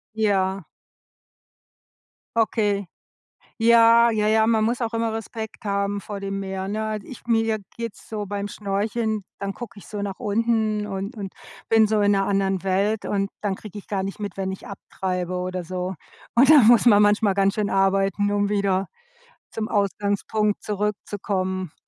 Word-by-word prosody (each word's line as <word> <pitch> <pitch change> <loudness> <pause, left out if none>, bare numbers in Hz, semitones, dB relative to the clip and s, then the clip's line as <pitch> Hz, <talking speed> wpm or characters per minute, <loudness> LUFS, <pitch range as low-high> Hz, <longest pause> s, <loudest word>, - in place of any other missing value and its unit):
Ja. 195 -3 +1 1.7
Okay. 210 -3 +1 0.7
Ja, 230 0 +6
ja, 215 -2 +1
ja, 220 0 +4
man 220 -1 +3
muss 235 +3 0
auch 230 -1 -2
immer 230 -1 0
Respekt 225 0 -6
haben 200 0 0
vor 205 0 -6
dem 195 0 -3
Meer, 190 -1 -4
ne? 215 +2 -2
Also, 215 -2 -4
ich 255 - -11
mir 225 -1 +3
je 220 -1 0 0.2
geht's 230 -2 -7
so 210 -2 -3
beim 205 0 -3
Schnorcheln, 210 +1 -2
dann 200 0 -4
gucke 235 -2 -9
ich 205 - -12
so 205 -1 -5
nach 200 -2 -4
unten 215 -1 0
und 195 +3 -5
und 200 -3 -6 0.4
bin 225 -1 +6
so 215 -1 +1
in 205 0 +4
'ner 195 -1 +2
anderen 195 -2 0
Welt 200 +3 0
und 200 -1 -1
dann 205 -2 -1
kriege 210 0 -10
ich 205 - -10
gar 195 -2 -1
nicht 195 +2 -5
mit, 205 -1 -5
wenn 190 0 -2
ich 190 - -8
abtreibe 185 -2 -4
oder 180 0 -3
so. 185 +2 -4 0.4
Und 265 +4 +6
dann 285 -8 +8
muss 240 0 +6
man 210 -3 +7
manchmal 205 -1 +3
ganz 195 0 +3
schön 210 -2 0
arbeiten, 195 +1 +2
um 205 0 +1
wieder 200 -2 +1 0.6
zum 220 -1 -3
Ausgangspunkt 205 0 0
zurückzukommen. 195 -3 -2
205 Hz, 170 wpm, -23 LUFS, 195-220 Hz, 1.7 s, dann